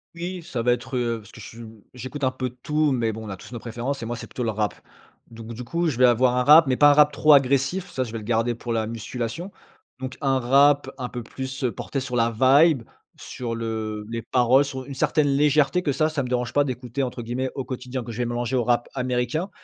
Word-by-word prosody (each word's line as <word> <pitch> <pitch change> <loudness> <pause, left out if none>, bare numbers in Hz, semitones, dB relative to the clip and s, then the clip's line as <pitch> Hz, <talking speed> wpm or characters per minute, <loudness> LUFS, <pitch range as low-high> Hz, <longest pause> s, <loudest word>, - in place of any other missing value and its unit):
Oui, 175 +1 -5
ça 135 -8 -4
va 120 +1 +3
être, 125 +2 -4
heu, 120 -2 -1
parce 105 +1 -16
que - - -13
je 105 - -9
su 115 0 -10 0.3
j'écoute 130 +3 -5
un 130 - +2
peu 130 -1 -3
de 125 - -21
tout, 150 0 +1
mais 115 -4 0
bon, 110 +1 -7
on - - -7
a 95 - -6
tous 125 - -13
nos 120 - -5
préférences 120 +3 -4
et - - -4
moi, 120 +1 -4
c'est - - -8
plutôt 125 - -5
le 115 - 0
rap. 105 -1 -1 0.6
Donc, 115 0 -9
du 120 +2 -7
coup, 170 +7 -1
je 135 - -1
vais 130 - +6
avoir 125 +1 +3
un 125 - +2
rap 150 +3 +7
mais 130 - +2
pas 145 +3 +6
un - - +6
rap 150 0 +5
trop 155 +2 +3
agressif. 140 +7 +3
Ça, 130 -6 -2
je 120 - -8
vais 115 - -4
le 110 - -8
garder 115 +1 +1
pour 120 0 -5
la 110 -1 -1
musculation. 120 - -5 0.5
Donc, 130 0 -6
un 135 -2 +1
rap 140 +2 +4
un 125 -2 -4
peu 120 -1 -6
plus, 130 +3 -6
heu, 125 - +1
porté 135 - -4
sur 125 -2 -3
la 115 0 +3
vibe, 135 +4 +4 0.3
sur 120 -2 -5
le 110 -2 -4
les 115 0 -4
paroles 130 +3 +3
sur 130 -1 -6
une 140 - -8
certaine 145 +2 +2
légèreté 145 +3 +3
que 145 - +1
ça 155 +3 +1
ça 150 -3 -2
me - - -4
dérange 125 -1 -1
pas 145 - +4
«d'écouter» 125 0 -4
entre 125 -1 -4
guillemets 125 +3 -3
au 135 - -3
quotidien 125 0 -5
que 115 - -7
je 110 - -8
vais 125 - 0
mélanger 120 +1 -2
au 120 - +1
rap 120 0 +1
américain, 125 +7 -1
125 Hz, 265 wpm, -24 LUFS, 120-140 Hz, 0.6 s, rap